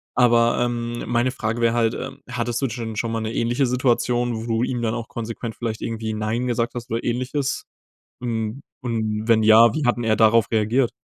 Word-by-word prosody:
Aber, 120 -1 +4
ähm, 120 -1 -3
meine 120 +1 +1
Frage 115 -2 -3
wär 115 -1 +3
halt, 115 -1 +2
ähm, - - -6
hattest 120 -1 -2
du 135 - +1
dschen 115 -2 -5
schon 115 +1 -1
mal 115 0 -2
'ne 110 +1 -3
ähnliche 120 +4 +1
Situation, 120 -1 +1
wo 110 +1 -5
du 115 0 0
ihm 125 -1 -1
dann 110 -1 0
auch 115 -1 -4
konsequent 115 0 -5
vielleicht 115 -2 -4
irgendwie 110 -1 -3
nein 110 +3 -1
gesagt 120 -1 -1
hast 120 -1 -7
oder 115 - -1
Ähnliches? 130 +3 -2 0.6
Und 115 +1 -3 0.2
und 110 -2 -2
wenn 110 -1 +5
ja, 110 +1 +7
wie 155 - -1
hat 120 - +3
'n 120 - -3
er 110 -1 +2
darauf 110 0 +4
reagiert? 115 +3 +2
115 Hz, 205 wpm, -22 LUFS, 110-120 Hz, 0.6 s, ja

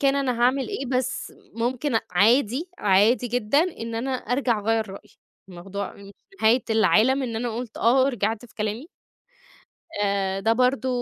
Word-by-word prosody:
كان 275 -1 +2
أنا 255 -4 -1
هاعمل 260 +2 +2
إيه، 400 -10 -4
بس 255 +1 -2 0.2
ممكن 245 +4 -2
أ 225 - +3
عادي، 240 - +2
عادي 210 +5 +3
جدًا 245 +2 +1 0.2
إن 230 0 -5
أنا 245 +4 -2
أرجَع 250 -1 0
أغيَّر 220 +1 0
رأيي. 195 - -12 0.4
الموضوع 190 +3 -6
مش 200 0 -13 0.3
نهاية 230 +4 +4
العالم 225 +4 +3
إن 230 -3 -3
أنا 235 -1 -3
قُلت 240 -2 -6
آه 245 +4 +3
ورجِعت 225 -4 -1
في 225 - -24
كلامي. 215 +7 -4 1.0
آآ، 200 -1 -1
ده 225 +3 +2
برضه 255 +2 +1
230 Hz, 160 wpm, -24 LUFS, 210-255 Hz, 1.0 s, نهاية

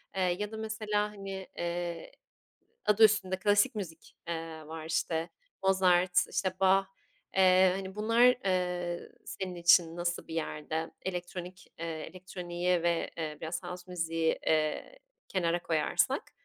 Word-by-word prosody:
eee, 190 - 0
ya 185 +4 0
da 220 - -6
mesela, 215 -1 -1
hani, 195 -2 -7
eee, 175 -1 -3 0.7
adı 210 +1 +5
üstünde 200 -3 +4
klasik 205 +2 +3
müzik, 170 -6 -7
eee, 160 -2 -5
var, 160 0 -7
işte, 165 +1 -1 0.3
Mozart, 185 -2 +4 0.2
işte, 190 -1 0
Bach, 195 0 +4 0.5
eee, 185 0 +6
hani, 190 0 -6
bunlar, 230 +3 +2 0.2
eee, 180 -2 -1
senin 185 -2 -5
için 170 -1 +5
nasıl 175 0 -2
bir 160 - -6
yerde? 160 0 -3
Elektronik, 180 0 -6
eee, 170 - -3 0.2
elektroniği 180 -1 -2
ve, 170 -1 +1
eee, 155 -2 -4
biraz 160 +1 -4
house 180 0 -8
müziği, 165 -2 0
eee, 155 - 0 0.3
kenara 175 -2 0
koyarsak. 155 -2 +1
180 Hz, 130 wpm, -31 LUFS, 165-190 Hz, 0.7 s, eee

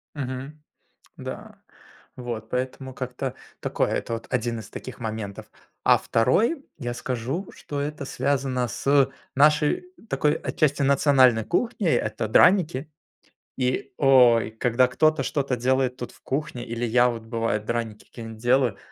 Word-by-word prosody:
Мгм. 135 +2 -6 0.5
Да. - - -8 0.6
Вот 120 -3 -5
поэтому 130 +1 -3
как-то 125 0 -4 0.3
такое, - - 0
это 115 - -2
вот 115 - -5
1 120 -2 -1
из 105 - -10
таких 130 - -9
моментов. 110 -3 -5 0.4
А - - +6
второй, 230 - +1
я 120 -4 -4
скажу, 125 - -3
что 145 - -6
это 145 0 -4
связано 130 -2 -1
с 140 +3 +2 0.3
нашей 150 - +3 0.2
такой 150 0 +2
отчасти 145 -2 0
национальной 135 -4 +4
кухней,- 215 - 0
это 105 +1 -1
драники. 160 - +4 0.7
И, 130 0 -1
ой, 125 -5 +5
когда 120 +3 +2
кто-то 155 +5 +2
что-то 140 -3 -1
делает 130 +1 +1
тут 120 - -6
в - - -22
кухне, 135 -3 -3
или 115 +1 -3
я 120 +2 +4
вот, 115 -2 -5
бывает, 115 -2 -2
драники 115 -2 -3
какие-нить 115 -2 -9
делаю, 120 -1 +2
125 Hz, 135 wpm, -25 LUFS, 115-140 Hz, 0.7 s, А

